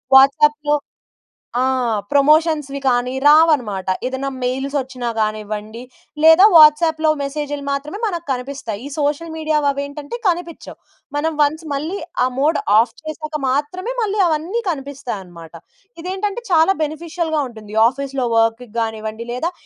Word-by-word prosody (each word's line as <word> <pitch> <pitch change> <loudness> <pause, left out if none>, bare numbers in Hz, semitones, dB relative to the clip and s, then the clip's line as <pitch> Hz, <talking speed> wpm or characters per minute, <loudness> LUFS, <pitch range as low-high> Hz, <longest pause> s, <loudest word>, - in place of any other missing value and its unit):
వాట్సాప్‌లో 295 +2 +5 0.9
ఆ! 255 - +2 0.5
ప్రమోషన్స్‌వి 300 -1 +2
కానీ 250 0 +1
రావనమాట. 290 - +4 0.2
ఏదన్నా 265 +1 -3
మెయిల్స్ 265 +3 -2
వచ్చినా 255 -2 -4
గానివ్వండి 215 +1 -3 0.4
లేదా 325 +4 +8
వాట్సాప్‌లో 315 0 +6
మెసేజ్‌లు 290 0 -4
మాత్రమే 295 +7 -4
మనకు 345 -4 -4
కనిపిస్తాయి. 250 -4 -5
ఈ - - -5
సోషల్ 295 +3 -1
మీడియా 310 -1 0
అవేంటంటే 285 +5 -5
కనిపిచ్చవు. 340 -2 -4 0.4
మనం 320 +2 0
వన్స్ 305 +3 +1
మళ్ళీ 310 +7 -3 0.3
ఆ - - +3
మోడ్ 305 +4 +2 0.2
ఆఫ్ 225 +1 +2
చేసాక 310 0 -5
మాత్రమే 300 - -2
మళ్ళీ 420 -1 -1
అవన్నీ 335 +8 -1
కనిపిస్తాయనమాట. 235 - -7 0.5
ఇదేంటంటే 390 +5 -3
చాలా 340 +2 +4
బెనిఫిషియల్‌గా 315 +1 -2
ఉంటుంది. 215 -3 -12
ఆఫీస్‌లో 275 0 -3
వర్క్ 225 +1 +2 0.2
గానివ్వండి 220 0 -3
లేదా 285 +8 -2
290 Hz, 120 wpm, -19 LUFS, 250-320 Hz, 0.9 s, లేదా